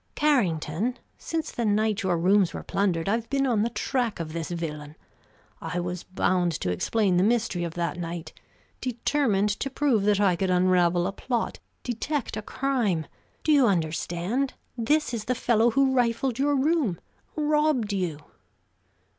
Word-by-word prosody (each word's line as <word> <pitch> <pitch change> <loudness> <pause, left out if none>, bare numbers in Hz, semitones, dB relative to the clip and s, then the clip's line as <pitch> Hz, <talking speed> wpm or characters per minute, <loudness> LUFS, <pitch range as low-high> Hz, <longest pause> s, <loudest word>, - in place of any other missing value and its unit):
"Carrington, 220 - +1 0.2
since 320 -1 -3
the 240 - -3
night 215 0 +1
your 185 -3 +1
rooms 185 0 +3
were - - -5
plundered 180 -4 0
I've 225 +3 0
been 275 -1 +1
on 235 -5 +2
the 230 - +1
track 240 -2 -1
of 155 -2 -5
this 165 -1 -4
villain. 150 -3 -5 0.7
I 180 - -3
was 175 0 -3
bound 180 -2 +1
to 90 - -2
explain 190 - +1
the 180 - +4
mystery 220 -5 +1
of 170 -1 -4
that 170 -2 -2
night; 170 -1 -5 0.5
determined 240 -4 +1
to 275 - -2
prove 270 -5 +1
that 205 -1 +3
I 195 -3 +3
could 190 +2 -1
unravel 180 -1 +3
a 195 - -1
plot, 235 +3 -3 0.2
detect 250 +3 -2
a - - -3
crime! 220 - -1 0.4
Do 310 - +2
you 280 -5 +5
understand? 175 - -1 0.2
This 260 +4 +1
is 220 -2 -3
the 255 - 0
fellow 235 -1 +3
who 270 +2 +2
rifled 245 0 +1
your 290 +1 +2
room. 275 - +1 0.4
Robbed 300 -7 +1
you!" 180 -6 -1
210 Hz, 160 wpm, -26 LUFS, 175-255 Hz, 0.7 s, you